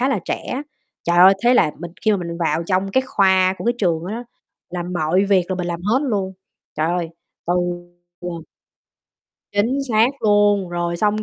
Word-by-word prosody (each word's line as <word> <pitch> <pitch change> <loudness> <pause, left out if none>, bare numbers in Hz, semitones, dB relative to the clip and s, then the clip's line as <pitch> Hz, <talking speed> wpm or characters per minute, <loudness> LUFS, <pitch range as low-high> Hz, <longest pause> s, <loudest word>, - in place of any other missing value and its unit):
khá 260 - +2
là 275 - +1
trẻ. 265 +3 -3 0.4
Trời 170 0 +1
ơi! 190 +2 +8
Thế 245 +1 +5
là 165 -11 +4
mình 170 0 -7
khi 215 - +4
mà 205 - +3
mình 170 -2 -5
vào 165 0 0
trong 190 0 0
cái 260 - +3
khoa 190 -3 +3
của - - -6
cái 240 +1 +2
trường 170 -3 0
đó 205 - -4
đó, 240 +1 -6 0.5
làm 175 0 -4
mọi 175 +3 +1
việc 195 -3 +3
là 185 - +1
mình 180 -1 -3
làm 170 0 -3
hết 220 +7 +2
luôn. 200 -8 -1 0.4
Trời 155 - +1
ơi, 175 0 -1 0.4
từ, 175 - +1 0.7
ờ 170 -2 -6 1.1
Chính 225 +7 +1
xác 225 +3 +4
luôn, 205 -3 +3
rồi 175 0 -2
xong, 210 +2 +1
190 Hz, 200 wpm, -20 LUFS, 175-210 Hz, 1.1 s, ơi